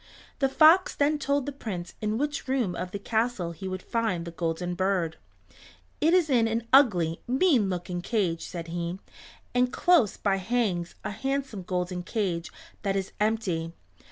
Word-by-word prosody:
The 270 -1 +2
fox 320 +6 +6
then 295 +1 +2
told 280 -1 0
the 285 - -3
Prince 200 -10 -6
in 215 0 0
which 290 +1 -2
room 255 -8 0
of 180 +1 -4
the 200 - -4
castle 220 -4 -1
he 170 +3 -7
would 185 -1 -5
find 220 -8 -1
the 170 - -6
Golden 170 +1 -2
Bird. 180 -3 0 0.8
"It 320 - +4
is 355 -4 +4
in 240 -5 +3
an 225 +1 -1
ugly, 180 - +4
mean 260 - +3
looking 175 -1 -3
cage," 180 -5 -1
said 170 -2 -6
he, 170 +1 -3 0.6
"and 250 0 +2
close 345 - +3
by 195 -2 +1
hangs 190 -4 -1
a - - -3
handsome 270 -1 -3
golden 180 0 -2
cage 180 -3 -2 0.3
that 195 -1 -1
is 190 -1 -2
empty. 195 -7 0
200 Hz, 165 wpm, -27 LUFS, 175-250 Hz, 0.8 s, fox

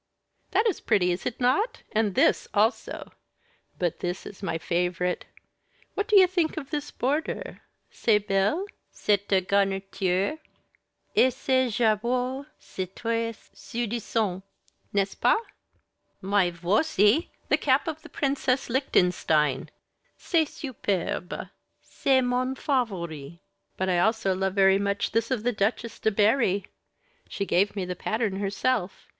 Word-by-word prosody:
"That 420 +4 +2
is 425 -7 0
pretty, 190 -5 +2
is 175 - -2
it 245 - -4
not 265 - +1
and 215 -3 +1
this - - +3
also? 220 +4 0 0.7
but 175 -3 -1
this 180 +1 -3
is 200 - -10
my 180 -4 -2
favorite. 180 +1 -1 0.7
What 405 0 -2
do 420 - +5
you 375 - +8
think 345 -3 0
of 280 -2 -6
this 295 -1 -3
border? 300 - -2 0.3
c'est 220 -3 +3
belle, 205 - +1 0.2
cette 195 -2 +1
garniture? 195 - 0 0.8
et 260 - +5
ce 260 0 +1
jabot, 245 +5 0
c'est 185 0 -7
tres 230 -1 -3
séduisant, 225 -4 -2 0.5
n'est 200 -1 +2
ce - - -9
pas? - - +3 0.8
Mais 195 -1 +2
voici, 205 - +2 0.2
the - - +4
cap 270 +2 +2
of 315 -1 -4
Princess 270 -3 0
Lichtenstein. 180 - +2 0.5
C'est 330 -3 +2
superb, 200 - -3 0.3
c'est 265 -1 +1
mon 250 +1 0
favori. 170 - -2 0.4
But 190 - -1
I 180 -2 +2
also 220 0 +2
love 190 +1 -1
very 195 0 +5
much 200 0 -1
this 230 0 0
of 250 -5 -1
the 245 - +2
Duchesse 220 +2 -1
de - - +2
Berri. 205 -2 +2 0.6
She 200 - -3
gave 200 +2 +2
me 195 -3 -2
the 180 0 -4
pattern 215 +1 -1
herself. 200 0 -1
210 Hz, 130 wpm, -26 LUFS, 190-255 Hz, 0.8 s, you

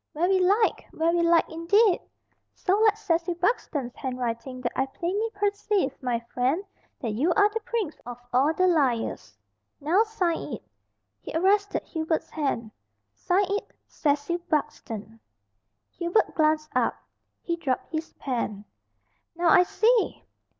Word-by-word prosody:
"Very 360 +4 +2
like! 405 +5 +2
very 335 +2 +2
like 335 0 +4
indeed. 355 +5 +3 0.5
So 375 - +1
like 430 -1 +4
Cecil 345 -4 0
Buxton's 330 - -1
handwriting 250 0 -4
that 240 - -1
I 265 - +1
plainly 380 +10 -2
perceive, 405 -7 0
my 245 -3 0
friend, 255 +10 -1 0.3
that 235 -5 -2
you 275 +12 +1
are 410 0 +5
the 450 +2 -3
prince 445 -7 -3
of 245 0 -7 0.2
all 270 +5 +4
the 370 +3 +2
liars. 245 - 0 0.4
Now 335 +8 +3
sign 425 -7 -1
it." - - -6 0.6
He - - -9
arrested 400 +4 +2
Hubert's 320 -1 -2
hand. 270 -7 -2 0.4
"Sign 385 +2 +1
it 405 - -1 0.2
'Cecil 295 +3 -1
Buxton.'" 225 -7 -3 0.7
Hubert 345 +5 +1
glanced 310 -1 +1
up. - - +2 0.5
He 340 - -1
dropped 270 -6 -2
his 320 0 -4
pen. 220 -6 -3 0.7
"Now 345 0 +2
I 360 - +7
see!" 440 +5 +2
335 Hz, 135 wpm, -26 LUFS, 265-395 Hz, 0.7 s, I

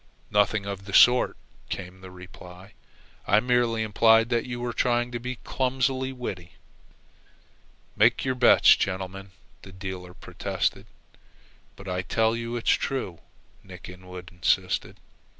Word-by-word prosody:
"Nothing 105 0 +2
of 100 -1 -6
the 100 - -4
sort," 125 0 +5 0.3
came 95 0 -7
the 95 - -10
reply. 90 +1 -13 0.5
"I 105 - +5
merely 120 -1 +1
implied 110 +1 +4
that 120 0 0
you 120 -1 -5
were 120 0 -3
trying 120 0 0
to 120 - -4
be 125 +2 -5
clumsily 130 0 -1
witty." 95 -9 -7 1.4
"Make - - +3
your 130 - +1
bets, 125 -1 +6
gentlemen," 95 +1 -4 0.3
the 95 - -13
dealer 95 -1 -8
protested. - - -3 0.9
"But 100 - -12
I 90 0 -2
tell 110 +5 +1
you 115 0 -4
it's 120 - +1
true," 125 -11 -2 0.4
Nick - - -11
Inwood 90 0 -11
insisted. 90 -2 -1
105 Hz, 135 wpm, -26 LUFS, 95-120 Hz, 1.4 s, bets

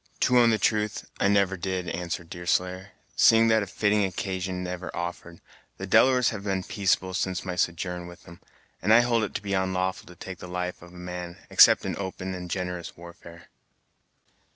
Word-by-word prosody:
"To 125 -1 +4
own 120 -1 +5
the 110 - +2
truth, 105 0 0
I - - +3
never 100 -1 +2
did," 95 -1 -3
answered 85 -1 -5
Deerslayer; 90 +2 -2 0.2
"seeing 115 0 +5
that 110 0 +4
a 100 - -4
fitting 105 +2 +1
occasion 95 -1 -3
never 90 0 -5
offered. 85 0 -6 0.4
The - - -5
Delawares 125 -2 +4
have 105 -3 -6
been 95 -2 -1
peaceable 95 -1 0
since 95 0 -2
my 90 -1 -3
sojourn 90 +1 -2
with 85 0 -14
'em, 85 0 -13 0.4
and 105 - +1
I 115 +2 +8
hold 120 -2 +1
it 105 - -4
to - - -3
be 100 - -4
onlawful 95 -1 -1
to 90 - -13
take 95 -1 -9
the - - -9
life 90 0 -4
of 85 0 -13
man, 90 -1 -7
except - - +7
in - - -2
open 95 -1 -5
and 90 -1 -7
generous 90 -2 -4
warfare." 85 0 -13
95 Hz, 185 wpm, -26 LUFS, 90-100 Hz, 0.4 s, I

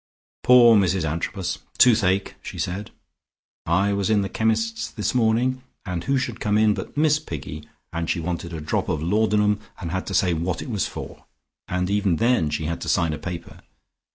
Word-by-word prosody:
"Poor 120 -2 +7
Mrs 95 -4 +2
Antrobus. 85 +4 -3 0.2
Toothache!" 100 -5 +4
she - - -8
said. 95 +4 -3 0.8
"I 95 +5 +2
was 100 0 0
in 105 -2 +3
the 95 - -3
chemist's 110 0 0
this 105 - -2
morning 125 +2 +2 0.2
and 90 -3 -4
who 135 0 +2
should 125 -3 -3
come 105 0 +1
in 110 -1 +4
but 95 +7 -7
Miss 150 0 +3
Piggy, 75 - -7 0.2
and 85 0 -2
she 90 - 0
wanted 85 +1 -4
a 80 -2 -5
drop 75 - -1
of 75 -1 -1
laudanum 105 +2 +2 0.2
and 85 -3 -5
had 95 +1 -3
to 95 - -3
say 90 -1 +3
what 85 +2 -2
it - - -7
was 105 -4 0
for, - - -9 0.4
and 90 0 -1
even 100 -4 +2
then 115 -5 +2
she 80 - -2
had 85 +2 -3
to - - -3
sign 85 -4 +2
a 75 - -5
paper. 90 -2 -7
100 Hz, 190 wpm, -23 LUFS, 85-110 Hz, 0.8 s, Poor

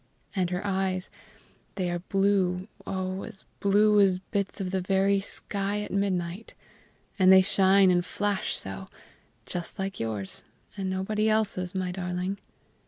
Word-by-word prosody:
And 185 -2 +1
her 180 +2 -3
eyes, 190 -2 -1 0.6
they 180 -3 -1
are 175 - -2
blue, 190 0 +1 0.2
oh, 185 0 -2
as 195 - -8
blue 210 +1 +4
as 190 -2 +4
bits 200 +2 -3
of 185 -2 -3
the 190 -1 0
very 195 +2 +2
sky 200 +1 -2
at - - -7
midnight! 195 0 -2 0.6
and 185 0 +7
they 190 0 +8
shine 190 0 +5
and 175 -1 +3
flash 205 +2 -1
so 95 0 -5 0.6
just 175 +2 -5
like 195 0 -3
yours, 110 -4 -4 0.3
and 195 -2 -3
nobody 210 +3 0
else's, 195 -4 0
my 185 -1 -1
darling." 180 +1 -3
190 Hz, 145 wpm, -27 LUFS, 180-200 Hz, 0.6 s, they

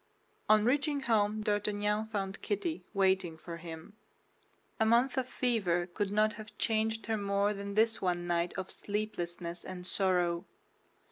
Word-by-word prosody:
On 215 0 +6
reaching 285 +3 +2
home 215 -3 +2
D'Artagnan 210 0 0
found 195 -3 -3
Kitty 225 - -2
waiting 190 -4 +2
for 170 +1 -7
him. 165 +3 -9 0.9
A - - +5
month 235 +4 +4
of 260 -1 -1
fever 195 -11 +1
could 195 +3 -2
not 215 +1 +3
have 215 +1 -11
changed 220 0 0
her 220 -1 0
more 200 0 +1
than 200 0 -5
this 225 +1 +3
one 175 -2 0
night 175 0 +1
of 190 0 -3
sleeplessness 175 -5 -4
and 180 -1 -7
sorrow. 180 -2 +1
205 Hz, 145 wpm, -32 LUFS, 180-220 Hz, 0.9 s, On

